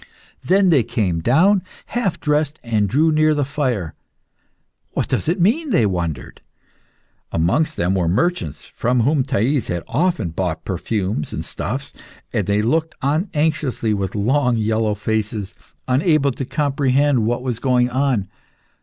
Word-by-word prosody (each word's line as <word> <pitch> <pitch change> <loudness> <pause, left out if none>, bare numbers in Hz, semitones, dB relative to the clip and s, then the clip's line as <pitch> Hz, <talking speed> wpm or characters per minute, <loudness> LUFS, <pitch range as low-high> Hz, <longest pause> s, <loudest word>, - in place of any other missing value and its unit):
Then 190 0 +4
they 145 -6 +5
came 95 -7 -1
down, 175 - +4 0.2
half 235 -7 -2
dressed, 150 0 0
and 110 -4 0
drew 155 - +3
near 155 0 +3
the 145 -2 0
fire. 125 - -2 1.0
"What - - -1
does - - -1
it 175 - 0
mean?" 280 - +2
they 120 - +3
wondered. 85 -5 -3 0.9
Amongst 145 - +1
them 90 +2 +1
were 90 -3 +1
merchants 95 - -1
from 125 +1 +1
whom 140 +4 +2
Thais 130 0 0
had 85 -1 -3
often 150 - 0
bought 80 -2 -3
perfumes 95 -2 -2
and - - -4
stuffs, 135 +6 -4 0.4
and 105 -6 0
they 100 +1 +2
looked 160 +7 0
on 155 +8 +1
anxiously 150 -7 0
with 100 -1 -3
long, 125 +3 +2
yellow 110 -1 0
faces, 105 -1 -2 0.3
unable 140 +2 +3
to 135 +2 -5
comprehend 140 -4 +1
what 120 +1 -1
was 125 -3 -2
going 125 -1 +2
on. 130 -6 0
125 Hz, 145 wpm, -20 LUFS, 105-150 Hz, 1.0 s, they